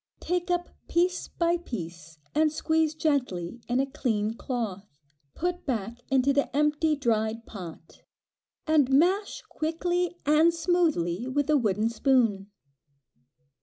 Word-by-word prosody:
Take 360 +1 -2
up 350 0 0 0.2
piece 360 +1 +1
by 340 0 +1
piece, 170 - -8 0.2
and 310 0 +3
squeeze 315 0 +1
gently 245 - -1
in 245 +2 +1
a 270 - +2
clean 225 -6 -1
cloth, 210 - -5 0.4
put 355 0 -3
back 230 -2 -2
into 270 +1 +3
the 280 0 +1
empty 300 +1 +2
dried 225 -4 -1
pot, 170 -5 -10 0.6
and 305 -4 +3
mash 360 +9 +2
quickly 350 +3 -1
and 305 +3 +5
smoothly 310 - +1
with 290 +3 0
a - - +5
wooden 215 -3 +1
spoon. 230 -5 +2
275 Hz, 125 wpm, -27 LUFS, 220-320 Hz, 0.6 s, and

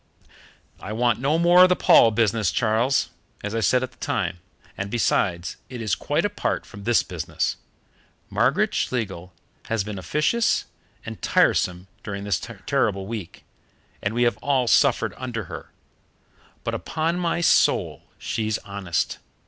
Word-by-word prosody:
"I 105 - -6
want 120 0 +1
no 140 +5 +1
more 175 +2 +6
of 185 - +8
the 180 - +4
Paul 115 - +6
business, 110 -3 +1
Charles, 115 +5 +1 0.3
as 105 +1 -3
I 115 - 0
said 125 +5 +2
at 130 - -5
the - - -26
time, 85 - -2 0.4
and 95 +1 -4
besides, 90 -6 0
it 125 -1 -7
is 110 -4 -1
quite 150 +6 0
apart 205 0 -2
from 100 -2 -12
this 120 -1 +3
business. 85 -4 -3 0.7
Margaret - - +1
Schlegel 95 -8 -2 0.4
has 115 -3 0
been 105 -1 -6
officious 150 - +1 0.4
and - - -8
tiresome 90 0 +2 0.2
during 100 -1 -5
this 100 -5 0 0.3
terrible 100 -2 0
week, 105 -4 -7 0.6
and 100 +3 -2
we 120 - +2
have 120 - +2
all 135 -3 0
suffered 135 +1 +3
under 120 -4 -4
her, - - -9 0.9
but - - -2
upon 165 +2 -2
my 170 -1 0
soul 170 - +3 0.2
she's 110 -1 -2
honest. 100 -4 -2
115 Hz, 150 wpm, -24 LUFS, 100-130 Hz, 0.9 s, of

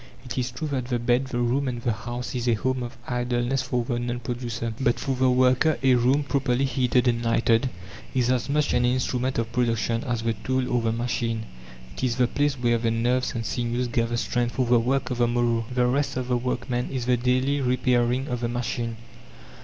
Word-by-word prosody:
It 125 - -5
is 125 -1 -1
true 155 +6 -5
that 130 -3 -2
the 125 -1 -1
bed, 120 +2 +1
the 130 - -4
room, 130 +4 +1
and 120 -2 -2
the 120 0 0
house 120 +3 -5
is 125 -1 -2
a 120 - +4
home 130 +3 -1
of 120 0 -6
idleness 125 +1 0
for 125 -2 -1
the 120 0 -1
non 120 0 -2
producer. 120 -1 -4
But 125 -3 +1
for 135 -1 -1
the 130 0 +3
worker, 130 +4 +3
a 130 -1 +5
room, 125 +4 +3
properly 135 -2 +1
heated 125 -1 +1
and 120 -1 +1
lighted, 115 +2 +2 0.5
is 125 -1 +2
as 130 +1 0
much 150 +1 +1
an 120 - +3
instrument 130 +1 0
of 115 0 -1
production 115 -1 0
as 120 -2 -2
the 115 0 +1
tool 130 +3 -1
or 120 - +2
the 115 -1 +1
machine. 115 -1 -2 0.5
It - - -6
is 125 -2 +1
the 125 0 +3
place 145 +3 0
where 120 -2 +1
the 115 0 0
nerves 120 +3 0
and 115 -1 -3
sinews 120 +1 -1
gather 115 0 0
strength 120 0 -1
for 130 - +1
the 120 0 +4
work 130 +2 0
of 125 - -2
the 120 - +4
morrow. 120 -1 +1
The 125 0 +2
rest 135 +2 0
of 130 -1 -3
the 125 - +2
workman 125 0 -2
is 130 -3 -3
the 125 0 +3
daily 130 +3 +1
repairing 125 0 +1
of 125 -1 -2
the 120 -1 -2
machine. 120 -1 -3
125 Hz, 220 wpm, -25 LUFS, 120-130 Hz, 0.5 s, a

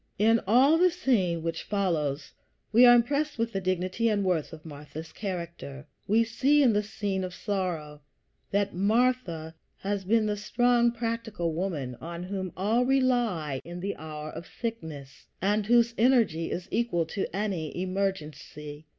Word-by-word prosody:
In 225 +3 +4
all 270 +9 +5
the 365 +1 +6
scene 210 - 0
which 165 0 -2
follows 155 -8 -1 0.4
we 240 +3 +7
are 240 - +9
impressed 285 +5 +1
with 230 0 -1
the 195 - -1
dignity 185 +5 0
and 205 -2 0
worth 175 -5 0
of 160 0 -11
Martha's 150 +1 -9
character. 170 -7 -6 0.2
We 220 +3 +4
see 275 +6 +3
in 240 -4 +4
the 210 - +2
scene 200 -2 -3
of 180 -1 -5
sorrow 170 -7 -3 0.5
that 200 0 0
Martha 200 -5 +1 0.3
has 200 0 -2
been 220 +3 +2
the 210 -1 -1
strong, 240 +3 +2
practical 230 -7 -3
woman, 155 -7 -3
on 170 +2 -6
whom 185 -1 -4
all 215 +6 +2
rely 240 - +1
in 175 +1 -8
the 200 +3 -3
hour 155 -1 -7
of 170 - -8
sickness, 160 - -7
and 205 +2 +1
whose 235 0 +4
energy 225 -10 +3
is 180 - -4
equal 225 -8 0
to 190 +5 -3
any 190 -6 -3
emergency. 155 -5 -4
195 Hz, 155 wpm, -28 LUFS, 165-230 Hz, 0.5 s, are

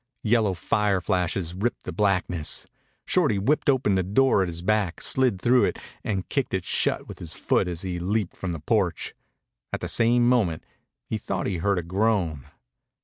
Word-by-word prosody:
Yellow 110 -4 +2
fire 100 +2 +1
flashes 90 -1 -1
ripped 105 +7 -2
the - - -5
blackness. 90 -6 0 0.4
Shorty 105 - +2
whipped 145 +10 +1
open 130 -7 +3
the 95 - +2
door 105 +5 +3
at 95 - +1
his 85 0 -5
back, 105 -3 +1
slid 125 -7 +1
through 125 +4 +4
it, - - -2 0.3
and 95 -4 -2
kicked 135 -8 -1
it 95 - -3
shut - - +1
with - - -9
his 80 - -6
foot - - +1
as 85 0 -4
he 90 -2 -3
leaped 100 +2 -1
from 90 - -4
the 85 - -4
porch. 75 - 0 0.6
At - - -2
the - - -4
same 120 +1 +3
moment 105 -11 +2 0.4
he - - -3
thought - - -3
he 95 - -1
heard 100 +3 +1
a 90 - -1
groan. 90 -6 0
95 Hz, 185 wpm, -25 LUFS, 90-110 Hz, 0.6 s, through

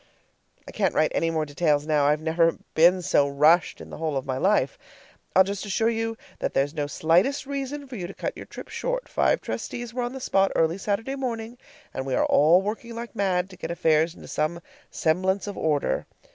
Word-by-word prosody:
I - - -8
can't 195 -5 0
write 155 - +3
any 165 - +1
more 160 -1 0
details 145 0 +1
now; 150 -2 +2
I've 150 +2 +2
never 165 +1 +2 0.2
been 175 +3 +5
so 140 -3 +3
rushed 155 +5 +3
in - - -11
the - - -7
whole 155 -3 -1
of 135 - -3
my 130 -1 -2
life. 210 - +1 0.6
I'll 190 - +8
just 200 +1 -4
assure 220 +3 +1
you 225 0 -2 0.2
that - - -3
there's 140 +2 +1
no 145 -3 -2
slightest 175 - +2
reason 280 +1 -4
for 260 - -8
you 180 -5 -4
to 195 - -9
cut - - -4
your - - -9
trip - - -10
short. - - -3
Five - - +1
trustees 240 -1 -5
were 250 - -2
on 245 +1 -3
the 265 - -6
spot 195 -6 +2
early 165 +3 +2
Saturday 220 +7 -2
morning, 235 -3 -4 0.4
and 130 - -4
we 130 - 0
are - - +2
all 165 +6 +5
working 225 +3 -5
like 235 0 -7
mad 185 -3 +1
to 185 - -12
get - - -6
affairs 160 0 +2
into - - -12
some 160 +3 -2 0.3
semblance 185 +4 0
of 205 -1 -5
order. 150 -3 0
180 Hz, 215 wpm, -25 LUFS, 155-225 Hz, 0.6 s, I'll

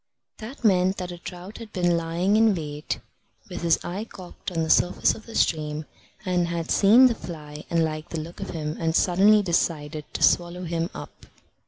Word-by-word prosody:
That 240 +4 -9
meant 190 -2 +3
that 180 -1 -5
a 175 - -8
trout 180 +4 -9
had 225 -2 -10
been 175 -3 +1
lying 170 +4 0
in 220 -2 +4
wait, 150 -2 -4 0.5
with - - -6
his 170 -1 +3
eye 190 +5 -4
cocked 185 -3 -9
on 165 -2 -1
the 160 - -3
surface 180 - +3
of 220 - -12
the 230 - -9
stream, 155 -1 0 0.4
and 180 -2 +1
had 170 -1 -3
seen 220 +6 +6
the 250 - +4
fly, 150 -7 -9
and 165 -1 +2
liked 155 0 -5
the 165 - -4
look 165 +3 -8
of - - -5
him, 155 -2 -4
and 160 -1 0
suddenly 200 +5 +5
decided 155 -4 -1
to - - -1
swallow 175 +1 +2
him 170 0 -2
up. - - -10
175 Hz, 195 wpm, -25 LUFS, 160-190 Hz, 0.5 s, seen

